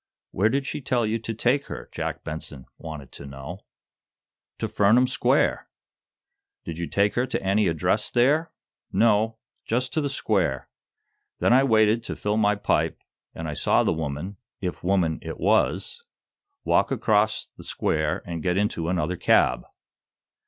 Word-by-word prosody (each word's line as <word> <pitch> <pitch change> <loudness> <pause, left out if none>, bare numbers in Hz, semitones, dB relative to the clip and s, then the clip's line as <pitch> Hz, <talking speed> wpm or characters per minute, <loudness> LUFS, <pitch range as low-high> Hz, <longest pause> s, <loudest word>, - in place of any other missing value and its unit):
"Where 105 +4 +2
did 135 +3 0
she 145 - -4
tell 125 -2 +1
you 110 +2 -1
to 115 +1 -4
take 130 +5 +1
her," - - -7
Jack - - -4
Benson 75 -4 -6
wanted 75 -5 -8
to 70 - -10
know. 70 +7 -8 1.0
"To - - -2
Furnam 110 +5 +4
Square!" - - +1 1.0
"Did 85 0 -6
you 85 - -2
take 100 +1 +1
her 125 +2 0
to 130 - -3
any 100 +2 +2
address 80 -3 +1
there?" 145 +7 +2 0.4
"No; 110 0 +3 0.3
just 125 +3 -1
to 155 - +1
the 145 - -1
square. 95 - 0 0.7
Then - - +3
I 130 +2 +6
waited 110 -2 +3
to - - -4
fill 105 +1 -1
my 105 -1 +3
pipe, 100 - 0 0.4
and 80 - -5
I 75 - -3
saw - - +2
the - - +1
woman, 80 +5 -4 0.2
if 90 -2 -4
woman 90 -4 +1
it - - -7
was, 110 - +1 0.6
walk - - +2
across 110 0 +1
the - - -15
square 80 -1 -1
and 85 -2 -5
get 90 +3 0
into 90 -5 0
another 90 -1 -1
cab." - - +3
105 Hz, 160 wpm, -25 LUFS, 80-115 Hz, 1.0 s, I